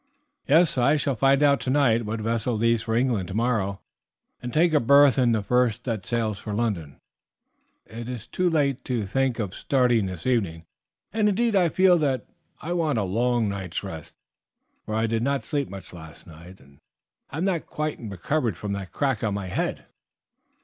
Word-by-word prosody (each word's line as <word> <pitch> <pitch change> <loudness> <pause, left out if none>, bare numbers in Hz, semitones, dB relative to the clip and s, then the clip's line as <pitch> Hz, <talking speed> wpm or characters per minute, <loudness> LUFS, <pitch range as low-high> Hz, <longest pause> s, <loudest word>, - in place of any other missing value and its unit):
"Yes, 160 -2 +4
I 140 +5 +4
shall 140 -2 -1
find 135 +4 +3
out 140 -1 +4
tonight 130 -5 +2
what 110 +1 -3
vessel 115 +2 -1
leaves 115 0 +2
for 115 0 -2
England 115 -6 +1
tomorrow, 100 -2 -1 0.6
and 125 - -5
take 165 +4 +3
a 150 - +5
berth 140 +1 +5
in 125 -2 +3
the 110 -3 0
first 125 0 +1
that 115 -6 -4
sails 110 -4 -1
for 105 -2 -5
London. 95 - -2 0.9
It 115 +2 -8
is 125 -4 -6
too 180 -1 0
late 140 -5 0
to 120 -5 -1
think 130 +4 0
of 100 -6 -3
starting 125 -6 +1
this 90 -2 -7
evening, 95 -10 0 0.5
and 215 -1 +2
indeed 225 +2 +1
I 180 -3 +4
feel 185 0 +4
that 135 -4 0 0.3
I 175 - -4
want 160 -7 0
a 105 - +1
long 115 +4 +1
night's 95 -3 -4
rest, 80 -6 -9 0.7
for 110 - -3
I 110 +1 +1
did 115 0 -1
not 140 +2 0
sleep 145 -2 -2
much 95 -3 -10
last 80 -1 -12
night, 85 +3 -13
and 70 +1 -21 0.5
have 160 +4 -4
not 185 -4 -1
quite 150 0 -3
recovered 110 - -2
from 100 +1 -4
that 100 -2 -6
crack 135 -6 -1
on 105 -3 0
my 100 -2 -4
head." - - -2
120 Hz, 185 wpm, -25 LUFS, 100-140 Hz, 0.9 s, a